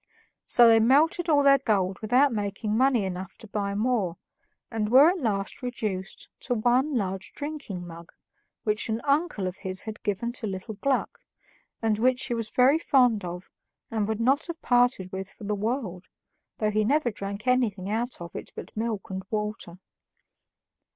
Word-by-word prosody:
So 240 -1 +7
they 225 -1 +6
melted 315 - +3
all 290 -2 +4
their 275 0 +6
gold 195 -7 0
without 250 +5 +3
making 210 0 -2
money 250 -3 +3
enough 185 0 -6
to 220 - -13
buy 200 -1 -2
more, 210 -6 0 0.5
and 215 -2 -1
were 275 +8 +7
at 370 - -4
last 200 -3 -2
reduced 215 -7 -4
to 245 - -2
one 250 +6 +2
large 190 -2 -3
drinking 285 -12 -6
mug, 170 0 -11 0.5
which 215 +1 -1
an 220 +1 -1
uncle 285 - +1
of 185 0 -4
his 190 -1 -2
had 220 -1 -7
given 210 +3 -2
to 240 -2 -4
little 195 +3 -5
Gluck, 265 +6 -1 0.6
and 215 -1 +1
which 255 +2 +2
he 245 - -2
was 230 -2 -3
very 265 +5 +4
fond 250 - +3
of 180 +1 -7 0.4
and 215 -2 0
would 220 0 -2
not 270 +8 +2
have 340 -1 -6
parted 245 -7 +2
with 190 0 -5
for - - -15
the 210 +1 -1
world, 205 -4 -3 0.5
though 215 -1 0
he 215 +1 +1
never 265 +2 +2
drank 200 0 -6
anything 230 -7 +1
out 230 +3 -2
of 170 -1 -9
it - - -6
but - - -9
milk 220 -3 -3
and 190 0 -3
water. 210 -4 -4
220 Hz, 175 wpm, -26 LUFS, 195-255 Hz, 0.6 s, So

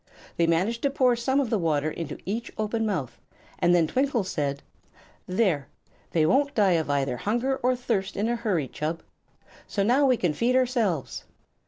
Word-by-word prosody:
They 170 - +2
managed 190 +8 +1
to 280 - +2
pour 255 -3 +3
some 265 +4 +1
of 265 -5 -1
the 220 - +2
water 155 -2 0
into 165 -2 -5
each 225 +5 -3
open 220 +1 -1
mouth, 160 - -3 0.4
and 175 +1 +4
then 170 -2 +4
Twinkle 255 - 0
said: 140 -6 -3 0.6
"There! 185 -8 +1 0.4
they 160 -2 +2
won't 280 - +2
die 205 -4 +4
of 160 -3 +1
either 140 -3 0
hunger 240 - 0
or 255 0 +1
thirst 225 -6 -2
in 210 +3 0
a 240 - +1
hurry, 200 - -1
Chub. 160 +5 -4 0.6
So 200 - -1
now 260 +7 +4
we 255 -2 +3
can 175 -7 0
feed 240 +9 +1
ourselves." 235 - 0
205 Hz, 180 wpm, -26 LUFS, 165-240 Hz, 0.6 s, and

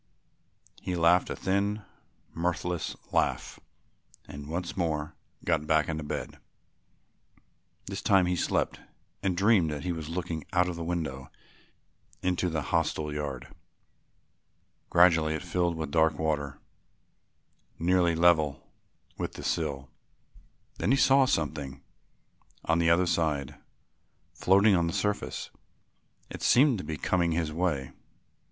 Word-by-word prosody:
He 90 -1 -3
laughed 85 +1 +4
a - - -3
thin 100 +2 -1 0.5
mirthless 90 0 -2 0.2
laugh - - 0 0.7
and 70 0 -9
once 85 +2 -4
more 80 -4 -2 0.3
got 75 - 0
back 80 -2 +3
into 80 -1 -3
bed. 75 - -5 1.5
This - - -5
time 95 -2 +4
he 90 0 0
slept - - -1 0.4
and 95 -3 -1
dreamed 95 -4 +4
that 75 -1 -4
he 90 - -1
was 80 -2 -5
looking 85 -2 -4
out 90 -1 +3
of 90 - -3
the 85 - -5
window 80 -6 -3 0.9
into 90 0 +1
the 80 -3 -2
hostel 80 -2 0
yard. 70 -4 -5 1.4
Gradually 80 -3 +4
it 80 - -5
filled 85 -1 0
with 80 -3 -4
dark 80 -2 +3
water 75 -3 -2 1.2
nearly 85 0 +2
level 80 -4 +2 0.5
with - - -3
the - - -9
sill. 70 -5 -2 0.9
Then - - 0
he 135 - +4
saw 135 0 +5
something 70 - -2 0.8
on 80 0 +2
the 85 -1 +3
other 85 +2 +4
side, 75 -6 0 0.8
floating 100 +3 +4
on 85 -1 +2
the 85 - -3
surface. 105 0 -2 0.8
It - - -7
seemed 130 -3 +4
to - - -5
be 80 - -4
coming 85 +1 +1
his 80 -2 -1
way. 75 -6 -1
85 Hz, 130 wpm, -28 LUFS, 75-90 Hz, 1.5 s, saw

